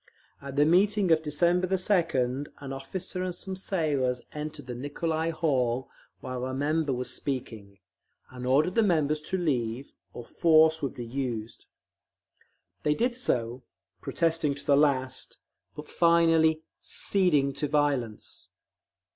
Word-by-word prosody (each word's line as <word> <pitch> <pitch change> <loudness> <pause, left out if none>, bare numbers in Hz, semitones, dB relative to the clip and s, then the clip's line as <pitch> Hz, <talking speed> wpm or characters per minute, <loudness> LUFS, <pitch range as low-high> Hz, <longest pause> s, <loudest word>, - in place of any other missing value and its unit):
At 140 -1 -8
the 145 +1 +4
meeting 195 +3 +3
of 160 -1 +5
December 170 +4 +1
2d, 165 -9 +1
an 135 -1 -7
officer 180 +7 -5
and 180 -1 -3
some 190 +1 -6
sailors 150 -10 0
entered 150 -1 -6
the 125 - -6
Nicolai 160 +5 -2
Hall 130 -6 0 0.3
while 130 -1 -5
a 130 0 -3
member 150 +2 0
was 125 0 -2
speaking, 110 -7 -5 0.5
and 125 -1 -6
ordered 150 +7 +3
the 230 - +3
members 155 -7 +1
to 190 +5 -3
leave, 130 -6 -2 0.2
or 120 - -9
force 160 +1 +4
would 140 - -3
be 120 - -6
used. 115 -3 -5 1.1
They 150 0 +1
did 240 +5 0
so, 125 - -1 0.4
protesting 160 -3 0
to 145 - -10
the 140 - +4
last, 130 -3 +1 0.4
but 150 0 -8
finally 165 -2 +3 0.2
"ceding 150 -8 +1
to 150 - -1
violence." 140 -7 -1
150 Hz, 135 wpm, -28 LUFS, 130-165 Hz, 1.1 s, of